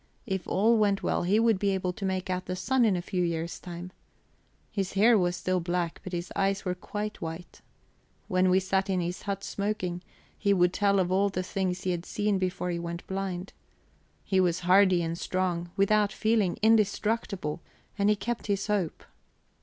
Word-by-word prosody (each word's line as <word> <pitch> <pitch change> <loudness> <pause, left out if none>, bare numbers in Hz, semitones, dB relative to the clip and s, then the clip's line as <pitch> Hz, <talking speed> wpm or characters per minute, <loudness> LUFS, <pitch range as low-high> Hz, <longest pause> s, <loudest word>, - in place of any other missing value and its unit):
If 190 -5 -3
all 220 +4 +3
went 200 -2 +2
well - - +1
he 195 +5 +2
would 225 -4 +3
be 200 - +1
able 185 -1 -2
to 200 +1 -5
make 185 -1 -1
out 185 0 -3
the 185 - -2
sun 260 +5 +2
in 205 -4 +3
a 175 - -3
few 185 0 -2
years' 170 -1 -2
time. 175 0 -8 0.8
His 195 -3 -2
hair 220 +4 +5
was 175 -3 +2
still 185 +1 0
black, 175 -1 -2
but 185 - -7
his 175 0 -4
eyes 195 +1 0
were 180 - 0
quite 210 +3 -5
white. 165 +2 -7 0.7
When 185 0 +2
we 185 +1 +5
sat 190 +1 0
in 185 -1 +1
his 175 +1 -3
hut, 200 -1 -4
smoking, 200 -4 -2 0.3
he 200 -2 +2
would 175 -1 +3
tell 200 -1 +2
of 180 -1 +1
all 195 +2 +3
the 185 -1 -3
things 185 -1 -2
he 185 - 0
had 175 0 -4
seen 205 -2 0
before 180 -1 -2
he 170 - -2
went 170 0 -5
blind. 190 -1 -4 0.7
He 190 - +1
was 180 -2 +2
hardy 185 0 +5
and 165 +1 -3
strong; 180 -2 -1
without 205 +1 +3
feeling, 215 -5 +1
indestructible; 210 -6 +1 0.3
and 200 0 +2
he 210 - +4
kept 240 +2 -4
his 200 -1 0
hope. 200 -6 -1
190 Hz, 195 wpm, -28 LUFS, 180-200 Hz, 0.8 s, hair